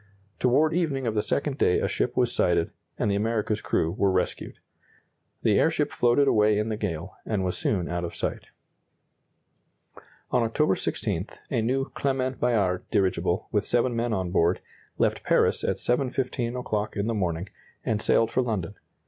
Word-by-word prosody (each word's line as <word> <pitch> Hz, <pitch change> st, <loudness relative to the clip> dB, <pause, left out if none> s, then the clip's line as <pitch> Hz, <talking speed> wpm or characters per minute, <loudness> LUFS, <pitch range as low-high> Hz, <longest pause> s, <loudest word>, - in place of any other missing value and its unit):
Toward 150 Hz, +6 st, +3 dB
evening 150 Hz, -7 st, 0 dB
of 115 Hz, -, 0 dB
the 105 Hz, -, +1 dB
second 140 Hz, +5 st, -1 dB
day 90 Hz, -, +4 dB
a -, -, 0 dB
ship -, -, -1 dB
was -, -, +2 dB
sighted, -, -, +2 dB, 0.3 s
and 105 Hz, -, +1 dB
the -, -, +1 dB
America's 105 Hz, 0 st, 0 dB
crew 80 Hz, -, 0 dB
were 100 Hz, +1 st, +1 dB
rescued. 95 Hz, -1 st, -2 dB, 0.9 s
The -, -, +4 dB
airship -, -, +2 dB
floated 125 Hz, +4 st, +3 dB
away 105 Hz, -3 st, +4 dB
in 105 Hz, +1 st, 0 dB
the 110 Hz, -, -1 dB
gale, 95 Hz, -4 st, -4 dB
and 105 Hz, -4 st, -1 dB
was 90 Hz, -, -1 dB
soon 90 Hz, -5 st, 0 dB
out 85 Hz, 0 st, -2 dB
of 85 Hz, -, -5 dB
sight. -, -, -3 dB, 1.8 s
On 125 Hz, -, +3 dB
October 115 Hz, +2 st, +2 dB
16, -, -, -2 dB, 0.2 s
a 115 Hz, -, +1 dB
new 130 Hz, +4 st, 0 dB
Clement 130 Hz, -1 st, -1 dB
Bayard 100 Hz, -7 st, +1 dB
dirigible, 95 Hz, -2 st, +1 dB
with 105 Hz, -1 st, +1 dB
seven 120 Hz, +2 st, +1 dB
men 115 Hz, +1 st, 0 dB
on 95 Hz, -4 st, -1 dB
board, 85 Hz, 0 st, +2 dB, 0.4 s
left -, -, +1 dB
Paris -, -, +2 dB
at -, -, +1 dB
7.15 125 Hz, -1 st, -1 dB
o'clock 105 Hz, -4 st, -2 dB
in 100 Hz, -, -1 dB
the 115 Hz, -, 0 dB
morning, 90 Hz, -3 st, -2 dB, 0.4 s
and 105 Hz, -1 st, 0 dB
sailed 115 Hz, +1 st, +3 dB
for 130 Hz, -, +2 dB
London. 105 Hz, -6 st, -2 dB
110 Hz, 170 wpm, -26 LUFS, 95-125 Hz, 1.8 s, day